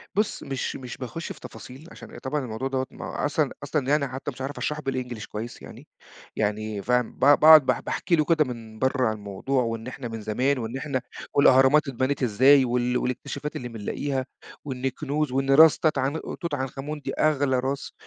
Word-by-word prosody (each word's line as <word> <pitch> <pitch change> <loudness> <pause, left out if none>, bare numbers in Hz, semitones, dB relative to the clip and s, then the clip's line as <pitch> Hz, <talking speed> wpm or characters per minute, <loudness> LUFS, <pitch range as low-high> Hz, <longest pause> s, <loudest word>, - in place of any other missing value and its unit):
بُص 210 +1 0
مش 135 -1 -3
مش 125 -2 -8
باخُش 135 +6 -6
في - - -9
تفاصيل، 135 +6 -11
عشان - - -12
أ - - -8
طبعًا 145 +2 -2
الموضوع 115 +3 -4
دوّة 130 -1 -1
ما - - -8
هو - - -6
أصلًا 150 -1 0
أصلًا 145 -1 -1
يعني، 145 -1 +2
حتى 130 +2 -5
مش 130 - -11
عارف 135 +2 -4
اشرحه 150 0 -2
بالEnglish 125 -4 -4
كويِّس 115 +3 -7
يعني - - -12 0.5
يعني 105 0 -2
فاهم؟ 125 +2 +1
ب - - -23
ب 145 +2 +6
باقعد 155 -2 +9
باح - - +1
باحكِ - - -5
له 155 -3 +4
كده 155 -2 +3
من 115 -3 -8
برّا 130 0 +1
عن 110 - -2
الموضوع، 105 +6 -2
وإن 115 0 -4
إحنا 130 -1 -6
من 115 -1 -6
زمان، 125 +7 0
وإن 120 +1 -4
إحنا 135 -3 -2 0.3
والأهرامات 140 +2 +5
اتبنِت 130 +1 -1
إزاي، 130 +4 +5
وال 125 0 0
والاكتشافات 140 +4 -4
اللي 125 - -4
بنلاقِيها، 130 +4 -3 0.4
وإن 130 -2 -5
الكنوز، 145 +2 -1
وإن 135 +1 0
راس 155 +2 +7
تات 155 -3 +1
عن 135 +4 0 0.2
توت 170 -3 -3
عنخ 135 -1 -3
آمون 150 +2 -5
دي - - -4
أغلى 145 -4 +2
راس، 135 +2 -3
130 Hz, 205 wpm, -25 LUFS, 125-145 Hz, 0.5 s, باقعد